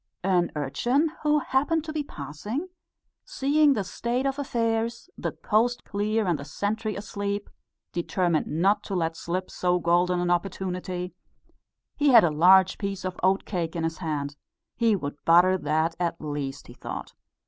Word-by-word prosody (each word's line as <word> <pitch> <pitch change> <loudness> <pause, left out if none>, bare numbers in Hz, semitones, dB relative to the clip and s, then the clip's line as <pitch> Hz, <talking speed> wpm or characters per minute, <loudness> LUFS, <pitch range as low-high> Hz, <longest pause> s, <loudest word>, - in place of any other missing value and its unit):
An 180 -2 +2
urchin, 245 - +1
who 300 0 +3
happened 290 +3 +1
to 310 -1 -6
be 310 - -1
passing, 210 - -5 0.5
seeing 300 - +3
the 210 -6 -1
state 240 +7 -2
of 275 +1 -1
affairs 230 +2 -1
the - - -3
coast 240 +3 +1
clear 210 +2 -1
and 170 -5 0
the - - -6
sentry 210 +7 -2
asleep 200 0 -4 0.4
determined 175 -1 0
not 190 +7 +2
to 195 - -3
let 165 -2 0
slip 180 +3 -3
so 180 0 +1
golden 175 +1 +2
an 175 0 0
opportunity; 180 0 -2 0.8
he 290 -1 +3
had 235 -4 +8
a 170 - +3
large 185 +4 +5
piece 195 -2 -3
of 185 -1 -4
oat 190 +1 +2
cake 170 -4 -3
in 165 - -2
his 165 0 -2
hand. 145 -4 -3 0.4
He 230 -3 +3
would 145 -5 -5
butter 175 +3 +6
that 160 -1 0
at 170 -1 -1
least, 145 -2 -4
he 120 - -12
thought. - - -7
190 Hz, 160 wpm, -26 LUFS, 170-230 Hz, 0.8 s, had